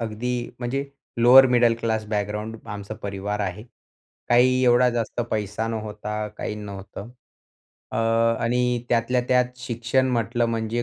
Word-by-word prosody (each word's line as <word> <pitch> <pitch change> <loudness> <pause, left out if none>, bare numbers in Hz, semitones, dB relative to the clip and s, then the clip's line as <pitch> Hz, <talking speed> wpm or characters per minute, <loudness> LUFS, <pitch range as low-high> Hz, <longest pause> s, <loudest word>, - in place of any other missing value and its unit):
अगदी 115 +2 -3 0.3
म्हणजे 130 +3 -2 0.4
lower 130 +3 +9
middle 120 -2 +4
class 110 -1 -1
background 105 +1 -3
आमचा 105 +1 -6
परिवार 100 +1 -3
आहे. 100 +2 -4 0.6
काही 125 +1 +4
एवढा 125 +1 +5
जास्त 120 0 -2
पैसा 105 +1 -2
नव्हता. 105 -1 -4
काही - - -4
नव्हतं, 100 +1 -8 0.8
अ, - - -2 0.5
आणि 125 0 0
त्यातल्या 120 +1 +2
त्यात 125 0 +2
शिक्षण 125 +1 0
म्हटलं 120 0 0
म्हणजे 115 +1 -2
115 Hz, 130 wpm, -24 LUFS, 105-125 Hz, 0.8 s, lower